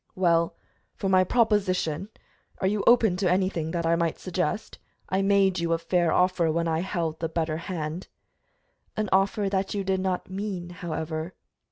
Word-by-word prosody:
"Well, 170 -2 +2 0.4
for 195 - -2
my 185 -1 +5
proposition 190 -5 +1 0.5
are - - -1
you 200 +1 +1
open 225 -6 +5
to 185 -1 +1
anything 180 -3 0
that 170 0 -2
I 165 +1 +3
might 165 -1 0
suggest? 185 +4 -3 0.3
I 190 +1 +1
made 195 -2 +3
you 170 0 0
a - - +2
fair 170 0 +1
offer, 180 -3 +2
when 170 +1 0
I 160 -1 +1
held 170 -3 -2
the 165 - -2
better 160 -1 -1
hand." 165 0 -5 0.9
"An 215 -2 -1
offer 195 +2 +2
that 195 +1 -1
you 200 - -1
did 190 0 0
not 185 -1 -2
mean, 190 -2 -4
however." 160 -1 -4
180 Hz, 170 wpm, -26 LUFS, 165-195 Hz, 0.9 s, my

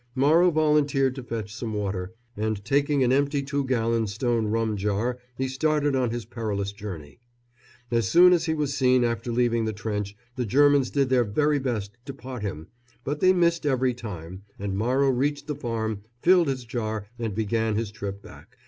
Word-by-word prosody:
Morrow 155 +7 +5
volunteered 150 -4 +2
to 130 - -7
fetch 110 -4 -5
some 115 -2 -4
water, 95 -3 -3 0.2
and 105 -1 -2
taking 140 +2 +2
an 125 - +2
empty 140 +1 +1
two 140 +1 -1
gallon 115 -3 +1
stone 115 +2 0
rum 110 0 0
jar 105 +5 -1 0.2
he 130 - -1
started 145 +1 +1
on 125 -2 +1
his 120 0 -4
perilous 100 -4 -3
journey. 95 -8 -9 0.7
As 115 -4 +1
soon 180 - +7
as 175 - +2
he 160 -2 0
was 145 -2 -1
seen 130 -2 +3
after 115 0 -1
leaving 115 -1 +1
the 110 - -2
trench 105 -1 -4 0.2
the 125 - -1
Germans 145 +2 +4
did 140 -2 +1
their 130 -2 +4
very 145 +7 +1
best 115 -4 -3
to 135 -1 -7
pot 130 -3 -7
him; 80 -7 -4 0.4
but 145 +3 -3
they 185 +2 +5
missed 170 -2 +2
every 130 -3 +1
time, 95 -6 -8 0.2
and 100 -1 -3
Morrow 130 +6 +2
reached 145 +3 -1
the 150 - -3
farm, 115 -6 -3 0.2
filled 180 -2 +5
his 130 -3 -2
jar 110 -3 -3
and 110 -4 -3
began 110 0 0
his 110 -1 -2
trip 100 -2 -6
back. 90 - -15
120 Hz, 185 wpm, -25 LUFS, 105-140 Hz, 0.7 s, soon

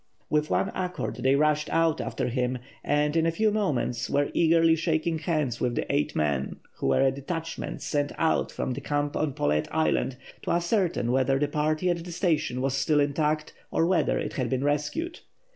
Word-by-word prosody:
With 150 0 +2
one 195 - +1
accord 180 -1 -3
they 135 +1 +3
rushed 150 +1 +2
out 165 -1 +2
after - - -2
him, 125 0 -1 0.3
and 150 +1 +1
in 165 0 +3
a - - +2
few 215 +6 +2
moments 145 - -1
were 145 0 +1
eagerly 165 0 +4
shaking 160 0 0
hands 155 -8 -1
with 120 -1 0
the - - -1
eight 75 - 0
men, 70 -3 0 0.2
who - - -2
were 70 - +3
a 135 - +4
detachment 160 +4 -5
sent 145 -1 -1
out 160 - +1
from - - -3
the 125 - -4
camp 145 0 -1
on 155 -3 0
Paulet 75 -5 0
Island 155 -4 +1 0.2
to - - -5
ascertain 175 - +1
whether 135 +1 +2
the 145 +1 +1
party 155 +4 0
at 170 -1 -3
the 175 - -8
station 160 -8 0
was 135 0 0
still 135 +3 +2
intact 150 +1 0 0.2
or 165 - +2
whether 185 +2 +2
it - - -3
had 130 -5 -1
been 130 0 0
rescued. 150 - -1
150 Hz, 195 wpm, -27 LUFS, 135-165 Hz, 0.3 s, eagerly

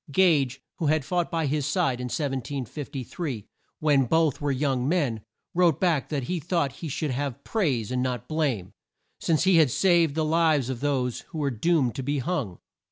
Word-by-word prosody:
Gage, 140 -6 +3 0.2
who 160 - 0
had 155 -2 +2
fought 175 +2 0
by 165 -2 -1
his 145 +1 0
side 140 -6 0
in - - -3
1753, 135 - -4 0.3
when 145 -4 +3
both 160 -1 +2
were 145 - 0
young 135 -1 0
men, 140 -11 0 0.3
wrote 175 -2 +3
back 170 -7 +1
that 145 -4 -2
he 180 +7 -2
thought 165 -3 0
he 160 +5 -7
should 145 +1 -2
have 140 0 -3
praise 135 - 0
and 125 0 0
not 125 -3 -2
blame, 140 - -1 0.5
since 160 -2 +1
he 190 -2 +5
had 155 -4 +5
saved 170 -1 +3
the 160 -1 +1
lives 155 -5 +2
of 125 - -5
those 130 -4 0
who 165 - -8
were 145 -2 0
doomed 130 0 +1
to - - -4
be 145 +3 -1
hung. 130 - -2
145 Hz, 185 wpm, -26 LUFS, 130-165 Hz, 0.5 s, he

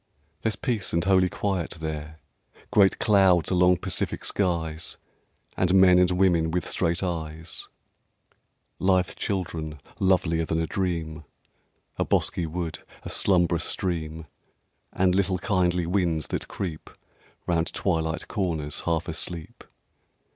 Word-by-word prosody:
There's 110 -2 0
peace 115 -6 -2
and 85 0 +2
holy 95 -1 +4
quiet 95 -5 -2
there, 80 0 -5 0.5
Great 100 -2 +5
clouds 95 -6 +4
along 90 0 +4
pacific 95 +1 -3
skies, 85 -4 -1 0.6
And 90 0 +2
men 90 -1 +7
and 90 -1 +4
women 90 -3 +3
with 90 +2 -1
straight 85 +1 0
eyes, 80 -2 -5 1.1
Lithe 95 -1 +2
children 80 -6 -3 0.2
lovelier 90 -4 +2
than 80 0 -1
a 80 - 0
dream, 80 -4 -3 0.7
A - - +1
bosky 85 - 0
wood, 80 -1 -4 0.2
a - - -5
slumbrous 85 -3 +3
stream, 80 -3 -2 0.7
And 90 -1 +2
little 95 -1 +1
kindly 90 -3 +1
winds 85 -4 0
that - - -3
creep 85 -5 -5 0.6
Round 85 -1 0
twilight 80 -3 -1
corners, 80 -8 -2
half 85 +1 0
asleep. 85 -1 -5
90 Hz, 120 wpm, -26 LUFS, 80-95 Hz, 1.1 s, men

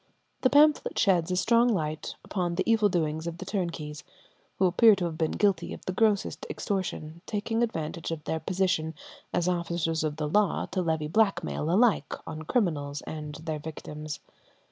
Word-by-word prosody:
The 255 - +4
pamphlet 295 +2 +4
sheds 180 -4 +3
a 180 - 0
strong 230 +6 +4
light 155 -7 -2
upon 175 -3 -2
the 190 - +1
evil 220 -2 +4
doings 160 -2 -1
of 170 0 -4
the 190 - -7
turnkeys, 165 -6 -3 0.5
who 190 - +3
appear 210 +4 +6
to 185 -2 -2
have 165 -2 -3
been 160 -1 0
guilty 195 -5 +1
of - - -15
the 185 - -2
grossest 210 0 +1
extortion, 170 -4 -3
taking 225 +2 -1
advantage 165 -7 -2
of 165 -2 -4
their 160 - -2
position 175 -3 0 0.4
as 175 0 0
officers 170 -2 0
of 150 -1 -1
the 150 -1 -2
law 205 +6 +2
to 185 - 0
levy 160 -3 0
blackmail 175 -4 +1
alike 215 +5 +3
on 155 -1 -6
criminals 155 - -1
and 150 -1 -6
their 155 -2 -3
victims. 150 0 -7
170 Hz, 170 wpm, -28 LUFS, 155-200 Hz, 0.5 s, appear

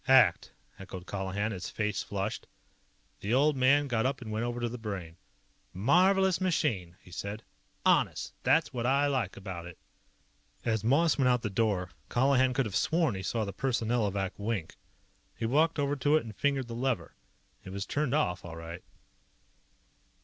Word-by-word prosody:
"ACT!" 120 -10 +5 0.3
echoed 95 -2 -8
Colihan, 100 +2 -2
his 95 -3 -5
face 105 -2 -1
flushed. 100 +1 -4 0.7
The 105 +5 0
old 145 +2 +4
man 140 +3 +4
got 115 -4 +1
up 135 +2 0
and 115 -4 -7
went 110 +2 -1
over 120 0 -3
to 120 - 0
the 120 +1 -6
Brain. 95 -7 -5 0.6
"Marvelous 185 - +4
machine," 110 - 0
he 90 - -16
said. 100 +4 -5 0.4
"Honest. - - +2
That's 145 +4 +3
what 120 -1 -1
I 140 +2 +3
like 130 -9 -1
about 95 -3 -6
it." 90 - -11 0.9
As 110 -2 0
Moss 150 +7 +3
went 130 - +4
out 125 -1 +2
the 105 - -2
door, 95 -4 0 0.2
Colihan 130 0 +3
could 135 -2 +2
have 100 -3 -4
sworn 160 -6 +2
he 95 - -4
saw 110 +4 -1
the 100 - -5
Personnelovac 110 -7 0
wink. 100 -5 -3 0.6
He 115 - -2
walked 155 +8 +3
over 145 0 +1
to 145 +3 +3
it - - -1
and 110 -2 -9
fingered 140 -1 0
the 115 - -6
lever. 125 0 -1 0.5
It - - -9
was 100 +1 -4
turned 145 -2 0
off, 95 -12 0
all 85 -1 -8
right. 85 +2 -8
115 Hz, 170 wpm, -30 LUFS, 100-135 Hz, 0.9 s, ACT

